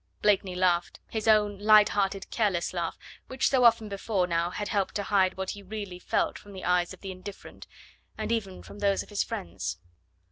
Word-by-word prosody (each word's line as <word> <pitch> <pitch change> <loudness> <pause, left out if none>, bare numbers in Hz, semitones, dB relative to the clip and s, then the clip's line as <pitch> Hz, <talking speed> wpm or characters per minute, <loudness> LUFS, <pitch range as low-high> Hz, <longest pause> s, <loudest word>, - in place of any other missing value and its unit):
Blakeney 195 -3 +2
laughed, 180 -1 +1
his 220 -1 -3
own 210 -2 +4
light 210 0 +6
hearted 195 -1 -1
careless 195 -7 0
laugh, 170 -2 -2 0.3
which 260 0 +1
so 260 -2 +3
often 230 -2 +5
before 200 -1 -1
now 170 -1 0
had 205 +3 -4
helped 200 -3 -1
to 205 - -1
hide 190 -2 +2
what 190 0 -2
he 205 - -8
really 200 -2 -6
felt - - -1
from 205 - -14
the 190 - -7
eyes 180 -1 +2
of - - -11
the 195 - -5
indifferent, 185 +2 -10 0.5
and - - -3
even 200 -5 -2
from 205 - -11
those 200 -1 +1
of - - -19
his 205 - 0
friends. 85 +1 -5
200 Hz, 200 wpm, -28 LUFS, 185-210 Hz, 0.5 s, light